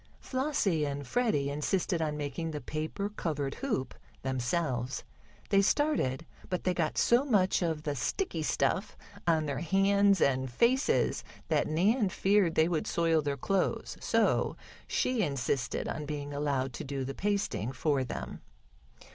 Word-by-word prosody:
Flossie 255 Hz, -, 0 dB
and 140 Hz, -1 st, -3 dB
Freddie 145 Hz, -, +1 dB
insisted 170 Hz, +4 st, 0 dB
on 150 Hz, -1 st, -1 dB
making 150 Hz, +3 st, -3 dB
the 150 Hz, -2 st, -4 dB
paper 155 Hz, -, -3 dB
covered 150 Hz, -9 st, -3 dB
hoop 215 Hz, -, -1 dB, 0.3 s
themselves. 130 Hz, 0 st, -1 dB, 0.5 s
They 195 Hz, -1 st, +5 dB
started, 195 Hz, -, +1 dB, 0.2 s
but 180 Hz, -1 st, -2 dB
they 185 Hz, -, +2 dB
got 165 Hz, -3 st, -1 dB
so 240 Hz, +3 st, +4 dB
much 200 Hz, -10 st, +2 dB
of 160 Hz, -3 st, -1 dB
the 145 Hz, -2 st, -2 dB
sticky 165 Hz, -, -2 dB
stuff 185 Hz, +6 st, 0 dB, 0.3 s
on 160 Hz, -2 st, +3 dB
their 140 Hz, -2 st, -2 dB
hands 195 Hz, +2 st, +3 dB
and 130 Hz, -2 st, +2 dB
faces 250 Hz, -, +2 dB, 0.3 s
that -, -, +2 dB
Nan 200 Hz, +8 st, +2 dB
feared 195 Hz, -3 st, +2 dB
they 160 Hz, -, +4 dB
would 170 Hz, -3 st, -1 dB
soil 165 Hz, -2 st, +2 dB
their 145 Hz, -1 st, -2 dB
clothes, 195 Hz, +3 st, -1 dB
so -, -, +2 dB, 0.3 s
she 250 Hz, -3 st, +1 dB
insisted 135 Hz, -, -1 dB
on 150 Hz, 0 st, -4 dB
being 145 Hz, -1 st, -4 dB
allowed 140 Hz, -3 st, -1 dB
to -, -, -5 dB
do 135 Hz, -1 st, -3 dB
the 135 Hz, -, -4 dB
pasting 200 Hz, -, -1 dB
for 135 Hz, +1 st, 0 dB
them. 125 Hz, -, -6 dB
160 Hz, 145 wpm, -30 LUFS, 140-195 Hz, 0.5 s, They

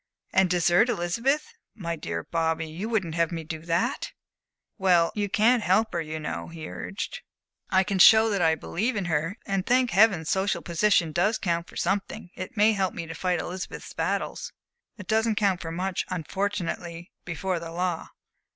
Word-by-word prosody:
"And 190 Hz, -1 st, +4 dB
desert 175 Hz, +5 st, +3 dB
Elizabeth? 235 Hz, -, 0 dB, 0.2 s
My 170 Hz, -6 st, -3 dB
dear 85 Hz, -, -4 dB
Bobby, 165 Hz, -1 st, -1 dB
you 175 Hz, +8 st, -5 dB
wouldn't 195 Hz, -8 st, -1 dB
have 170 Hz, 0 st, +1 dB
me 165 Hz, -1 st, -4 dB
do 160 Hz, 0 st, -6 dB
that?" 170 Hz, +2 st, -1 dB, 0.7 s
"Well, 180 Hz, -3 st, +4 dB
you 205 Hz, -2 st, -2 dB
can't 230 Hz, +3 st, +4 dB
help 210 Hz, +2 st, +2 dB
her, 170 Hz, -, 0 dB
you 155 Hz, 0 st, -5 dB
know," 150 Hz, -, -4 dB
he 165 Hz, -2 st, -8 dB
urged. 345 Hz, -, -6 dB, 0.5 s
"I 190 Hz, 0 st, +4 dB
can 190 Hz, 0 st, -2 dB
show 220 Hz, +4 st, +8 dB
that 200 Hz, -3 st, 0 dB
I 160 Hz, -1 st, +4 dB
believe 220 Hz, +9 st, -2 dB
in 200 Hz, -3 st, -1 dB
her. 165 Hz, +4 st, -1 dB
And, 195 Hz, -1 st, -1 dB
thank 250 Hz, +2 st, +2 dB
Heaven! 195 Hz, -4 st, +4 dB
social 190 Hz, +4 st, 0 dB
position 170 Hz, -1 st, +2 dB
does 200 Hz, +7 st, +2 dB
count 170 Hz, -2 st, -1 dB
for -, -, -15 dB
something. 200 Hz, -1 st, -2 dB
It 185 Hz, +6 st, -8 dB
may 210 Hz, +2 st, +5 dB
help 195 Hz, -3 st, -1 dB
me 170 Hz, -, -4 dB
to 165 Hz, -, -7 dB
fight 180 Hz, 0 st, -1 dB
Elizabeth's 185 Hz, +3 st, -6 dB
battles." -, -, -2 dB, 0.5 s
"It 205 Hz, -, -9 dB
doesn't 220 Hz, +2 st, +1 dB
count 200 Hz, -4 st, +1 dB
for 165 Hz, -, -5 dB
much, 185 Hz, +2 st, -2 dB
unfortunately, 175 Hz, -1 st, -3 dB
before 180 Hz, +1 st, -2 dB
the 165 Hz, 0 st, -7 dB
law." 175 Hz, -1 st, -2 dB
180 Hz, 180 wpm, -26 LUFS, 165-205 Hz, 0.7 s, show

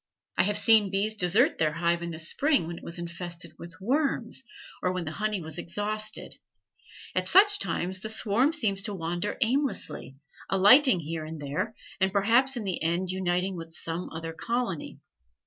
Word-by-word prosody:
I -, -, +3 dB
have 205 Hz, +1 st, 0 dB
seen 215 Hz, -1 st, +5 dB
bees 200 Hz, +3 st, +1 dB
desert 215 Hz, -, +2 dB
their 155 Hz, -1 st, +2 dB
hive 170 Hz, +1 st, 0 dB
in 170 Hz, -, -4 dB
the 165 Hz, -, -6 dB
spring 275 Hz, -, +1 dB
when 170 Hz, +1 st, -6 dB
it -, -, -19 dB
was 170 Hz, -, -5 dB
infested 170 Hz, -1 st, -6 dB
with 170 Hz, -1 st, -11 dB
worms, 260 Hz, +1 st, -1 dB, 0.4 s
or 180 Hz, -, +1 dB
when 185 Hz, -2 st, -3 dB
the 155 Hz, -, -4 dB
honey 210 Hz, +2 st, -2 dB
was 160 Hz, +1 st, -5 dB
exhausted; 215 Hz, +5 st, -3 dB, 0.8 s
at -, -, -1 dB
such 410 Hz, +1 st, +6 dB
times 185 Hz, -, -2 dB
the 215 Hz, -, -4 dB
swarm 220 Hz, +6 st, +2 dB
seems 215 Hz, -12 st, +3 dB
to 205 Hz, 0 st, -3 dB
wander 175 Hz, +3 st, -3 dB
aimlessly, 250 Hz, -, -1 dB, 0.3 s
alighting 205 Hz, -, +6 dB
here 160 Hz, +1 st, -5 dB
and 155 Hz, 0 st, -7 dB
there, 145 Hz, +10 st, -3 dB, 0.2 s
and 190 Hz, 0 st, +2 dB
perhaps 235 Hz, +7 st, +3 dB
in 230 Hz, -, -3 dB
the 190 Hz, -3 st, -3 dB
end 170 Hz, +3 st, 0 dB
uniting 185 Hz, 0 st, -1 dB
with 165 Hz, -1 st, -8 dB
some 165 Hz, +2 st, -4 dB
other 165 Hz, 0 st, -6 dB
colony. 245 Hz, -, -3 dB
190 Hz, 175 wpm, -27 LUFS, 170-225 Hz, 0.8 s, such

